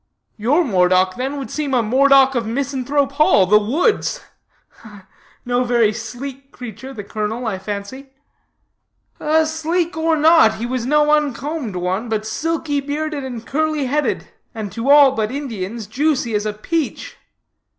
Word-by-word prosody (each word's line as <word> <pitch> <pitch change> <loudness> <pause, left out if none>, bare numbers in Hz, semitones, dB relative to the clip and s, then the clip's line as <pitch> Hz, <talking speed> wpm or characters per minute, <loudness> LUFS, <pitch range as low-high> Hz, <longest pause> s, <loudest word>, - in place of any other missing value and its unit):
"Your 265 +11 +2
Moredock, 185 - +2
then, 265 +3 -3
would 275 - -6
seem 290 -3 -2
a 240 - +2
Moredock 270 +3 +4
of 235 -3 -2
Misanthrope 275 +2 -1
Hall 280 -9 +4
the 210 +3 +5
Woods. 300 - 0 1.3
No 245 +1 +1
very 235 -3 +2
sleek 260 +5 -8
creature, 245 +2 -9
the 215 -6 -7
colonel, 215 +4 -4
I 205 -4 -2
fancy." 205 +7 -6 1.4
"Sleek 320 +2 -1
or 320 0 +1
not, 315 -5 +5
he 230 - -4
was 245 -1 -3
no 300 +1 +3
uncombed 295 - -1
one, 185 +6 -2
but 215 -1 -2
silky 300 +4 -2
bearded 295 +1 -3
and 240 -3 -7
curly 310 -1 -1
headed, 295 +4 -1 0.3
and 215 -3 -5
to 235 +4 -3
all 285 -1 +7
but 220 -4 -2
Indians 230 -6 -5
juicy 255 +1 0
as 210 0 0
a 210 - -2
peach. 310 +9 -3
260 Hz, 145 wpm, -19 LUFS, 220-295 Hz, 1.4 s, all